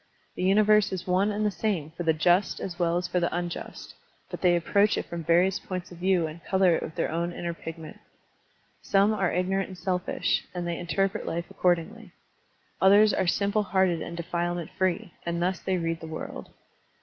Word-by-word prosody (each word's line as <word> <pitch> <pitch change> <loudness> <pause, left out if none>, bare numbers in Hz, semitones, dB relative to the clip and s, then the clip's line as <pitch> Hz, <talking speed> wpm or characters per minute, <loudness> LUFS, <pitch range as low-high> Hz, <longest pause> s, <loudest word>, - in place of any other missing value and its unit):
The - - -5
universe 210 +2 +4
is 185 -1 -4
one 185 +3 +2
and 210 +1 -1
the. 210 - +2
same 175 -5 -2
for 165 - -8
the 165 -2 +3
just 175 +5 +2
as 180 -1 -6
well 170 -1 +2
as 180 +1 -2
for 180 0 0
the 170 - 0
unjust, 175 0 -5 0.4
but - - -6
they 180 -2 +4
approach 200 +5 +2
it - - -2
from 170 -1 -6
various 175 +4 +3
points 185 -1 -6
of 175 - -11
view 185 -2 +2
and 160 +2 -8
color 190 -3 +3
it - - -2
with 160 - -6
their - - -1
own 170 +2 -1
inner 170 0 -4
pigment. 165 -1 -9 0.8
Some 200 +2 +3
are 190 -5 0
ignorant 190 +2 0
and 185 - -10
selfish, 180 -1 -1
and 175 -1 -3
they 170 -1 -3
interpret 195 +5 -1
life 170 +1 -2
accordingly. 180 +3 -1 0.7
Others 205 +2 +6
are 185 - 0
simple 200 +4 +1
hearted 190 -4 +1
and 170 - -6
defilement 175 0 -3
free, 185 -2 -1
and 170 0 -2
thus 180 +1 0
they 190 -1 -1
read 165 -1 -2
the 160 - -7
world. 160 0 -7
180 Hz, 195 wpm, -27 LUFS, 170-195 Hz, 0.8 s, Others